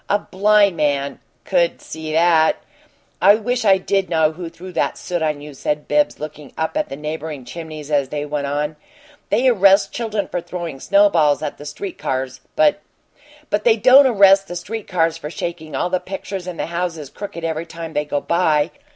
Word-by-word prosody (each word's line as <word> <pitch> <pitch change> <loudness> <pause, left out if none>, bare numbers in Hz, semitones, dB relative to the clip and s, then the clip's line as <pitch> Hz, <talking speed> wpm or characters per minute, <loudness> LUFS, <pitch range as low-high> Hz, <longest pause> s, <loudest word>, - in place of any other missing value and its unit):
A 205 - +4
blind 205 -1 +3
man 140 -2 0 0.3
could - - +1
see 160 -1 -7
that." 160 0 +4 0.7
"I 200 +3 +7
wish 245 +2 -1
I 195 -3 +5
did 195 0 -1
know 160 -2 +3
who 170 +1 -7
threw 185 +3 -11
that - - -1
soot 175 -2 -3
on 150 -2 -1
you," 150 0 -9
said 150 +2 -3
Bibbs, 295 0 +1
looking 150 -1 -8
up 160 - -2
at 305 0 -1
the - - -5
neighboring 150 -2 -6
chimneys, 155 0 -8
as 140 -3 +1
they 145 0 -3
went 145 -1 -3
on. 150 +2 -2 0.5
"They 240 +5 +2
arrest 195 -4 +4
children 215 -4 -2
for 175 - -3
throwing 170 -4 -6
snowballs 175 -6 +3
at - - -4
the 145 - -8
street 380 - -7
cars, 130 0 -3
but 200 -1 +3 0.3
" 295 +1 -26
"But 210 0 +1
they 230 -1 +4
don't 260 +5 +7
arrest 195 -4 +5
the 175 - -6
street 215 +5 -6
cars 165 -4 +1
for 150 - -6
shaking 160 -3 -5
all 175 +6 -1
the 185 - +1
pictures 190 0 -6
in 180 -2 -6
the - - -2
houses 170 -4 -4
crooked 195 -5 -7
every 165 0 -3
time 165 0 -8
they 150 0 -1
go 145 -1 -2
by. 160 -3 +1
170 Hz, 195 wpm, -20 LUFS, 150-200 Hz, 0.7 s, I